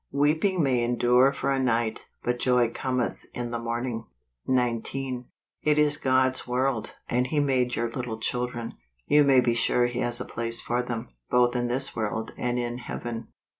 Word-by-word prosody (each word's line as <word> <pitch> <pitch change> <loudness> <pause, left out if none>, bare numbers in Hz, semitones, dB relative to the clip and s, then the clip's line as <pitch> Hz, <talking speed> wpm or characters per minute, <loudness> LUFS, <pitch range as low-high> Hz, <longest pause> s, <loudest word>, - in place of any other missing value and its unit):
il 140 - -3
Weeping 160 +5 +3
may 125 -4 +2
endure 125 +2 +4
for 140 0 -1
a 135 - +1
night, 115 -3 0 0.2
hut 120 0 0
joy 125 -2 +3
cometh 130 -2 -1 0.2
in 120 -1 -3
the 120 - -2
morning." 115 -1 -3 0.4
19. 125 +1 -1 0.4
It 150 0 +2
is 150 -1 +3
God's 130 0 +2
world, 125 -1 -1
and 125 +1 +1
He 150 +3 0
made 130 -3 +1
your 120 - 0
little 115 -1 -4
children. 120 0 -2 0.3
You 150 0 +5
may 135 -2 +6
be 120 -1 +2
sure 120 +1 +3
He 120 0 -2
has 120 -1 0
a 125 - -3
place 115 0 -3
for 120 +1 -1
them, 120 - -4 0.2
both 125 0 +3
in 120 0 0
this 130 +3 -2
world 110 0 -2
and 120 0 -1
in 120 0 -2
Heaven. 120 -1 -5
125 Hz, 180 wpm, -27 LUFS, 120-130 Hz, 0.4 s, may